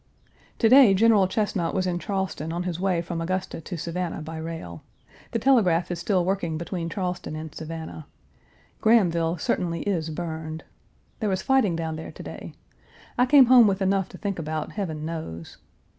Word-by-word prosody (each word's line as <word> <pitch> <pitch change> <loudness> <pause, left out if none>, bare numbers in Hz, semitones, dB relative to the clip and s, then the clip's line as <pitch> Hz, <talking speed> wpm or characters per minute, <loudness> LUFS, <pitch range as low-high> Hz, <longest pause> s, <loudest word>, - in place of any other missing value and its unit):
To 225 - +3
day 250 -5 +7
General 210 -2 +5
Chesnut 190 -4 -1
was 185 -1 +1
in 175 -1 -1
Charleston 190 -5 -3
on 175 +1 -2
his 180 -2 -3
way 180 -3 0
from 165 -1 -4
Augusta 185 0 -3
to 175 +1 -6
Savannah 170 0 -4
by 160 +1 -7
rail. 160 - -6 0.5
The - - -1
telegraph 205 -10 +3
is 175 - -3
still 180 -1 +1
working 180 -4 -1
between 170 0 -4
Charleston 180 -3 -4
and 155 -1 -7
Savannah. 160 -1 -7 0.7
Grahamville 175 -7 +3
certainly 170 0 -1
is 170 -6 -1
burned. 160 -1 -5 0.6
There 215 -3 0
was 190 -1 -1
fighting 265 -10 +3
down 160 -1 -3
there 160 - -7
to - - -10
day. - - -9 0.6
I 250 - +3
came 275 0 +8
home 245 -2 +7
with 195 -1 +1
enough 195 -1 +1
to - - -11
think 200 -4 -3
about, 155 -1 -3
Heaven 160 -7 -4
knows! 155 - -6
175 Hz, 175 wpm, -25 LUFS, 160-195 Hz, 0.7 s, came